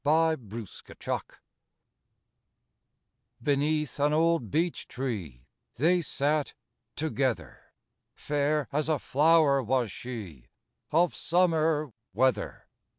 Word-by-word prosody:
A 160 Hz, +2 st, +4 dB
FOREST 110 Hz, -5 st, -10 dB
IDYLL -, -, -3 dB
I -, -, -10 dB, 2.1 s
Beneath 150 Hz, 0 st, 0 dB
an 145 Hz, +1 st, +3 dB
old 165 Hz, -7 st, +2 dB
beech 170 Hz, -, -1 dB
tree 95 Hz, -, -5 dB, 0.3 s
They 175 Hz, +6 st, +3 dB
sat 150 Hz, -1 st, 0 dB, 0.4 s
together, 130 Hz, -, -2 dB, 0.4 s
Fair 145 Hz, 0 st, 0 dB
as 150 Hz, +2 st, 0 dB
a 155 Hz, -, +3 dB
flower 150 Hz, 0 st, +4 dB
was 125 Hz, -2 st, 0 dB
she 100 Hz, -, -8 dB, 0.4 s
Of 170 Hz, +2 st, +3 dB
summer 160 Hz, -5 st, +1 dB, 0.2 s
weather. 130 Hz, -6 st, +1 dB
145 Hz, 95 wpm, -28 LUFS, 125-160 Hz, 2.1 s, A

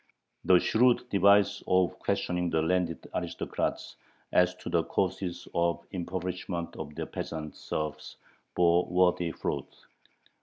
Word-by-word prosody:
The 90 Hz, -, +7 dB
shrewd 120 Hz, +6 st, +3 dB
device 100 Hz, +1 st, +4 dB
of 90 Hz, -1 st, +2 dB
questioning 90 Hz, -1 st, -1 dB
the 80 Hz, -1 st, +1 dB
landed 90 Hz, 0 st, 0 dB
aristocrats -, -, -3 dB, 0.3 s
as 90 Hz, 0 st, +3 dB
to -, -, -11 dB
the -, -, +2 dB
causes 90 Hz, -2 st, -2 dB
of 85 Hz, 0 st, +1 dB
the 95 Hz, -, -5 dB
impoverishment 90 Hz, -1 st, -4 dB
of 75 Hz, -1 st, -7 dB
their -, -, -3 dB
peasant 80 Hz, -1 st, -6 dB
serfs 75 Hz, -1 st, -5 dB, 0.4 s
bore 85 Hz, 0 st, +4 dB
worthy 90 Hz, -1 st, +2 dB
fruit. -, -, -4 dB
90 Hz, 125 wpm, -29 LUFS, 85-95 Hz, 0.4 s, The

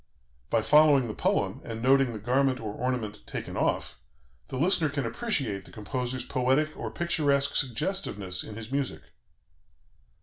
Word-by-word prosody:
By 115 Hz, -2 st, +2 dB
following 150 Hz, -3 st, +6 dB
the 110 Hz, -, -4 dB
poem, -, -, 0 dB
and 115 Hz, -1 st, -6 dB
noting 135 Hz, +1 st, +4 dB
the 110 Hz, -, -5 dB
garment 130 Hz, +4 st, +1 dB
or 110 Hz, -2 st, -5 dB
ornament 120 Hz, -5 st, -2 dB
taken -, -, -5 dB
off, -, -, -1 dB, 0.5 s
the 130 Hz, -, -5 dB
listener 160 Hz, +1 st, +2 dB
can 140 Hz, -2 st, -2 dB
appreciate 115 Hz, -, -2 dB
the -, -, -13 dB
composer's 125 Hz, +3 st, -3 dB
poetic 135 Hz, +5 st, +1 dB
or -, -, -4 dB
picturesque 145 Hz, -5 st, +1 dB
suggestiveness 115 Hz, -, -1 dB
in 110 Hz, -, -8 dB
his 115 Hz, +2 st, -8 dB
music." 140 Hz, -1 st, -2 dB
130 Hz, 145 wpm, -28 LUFS, 115-145 Hz, 0.5 s, following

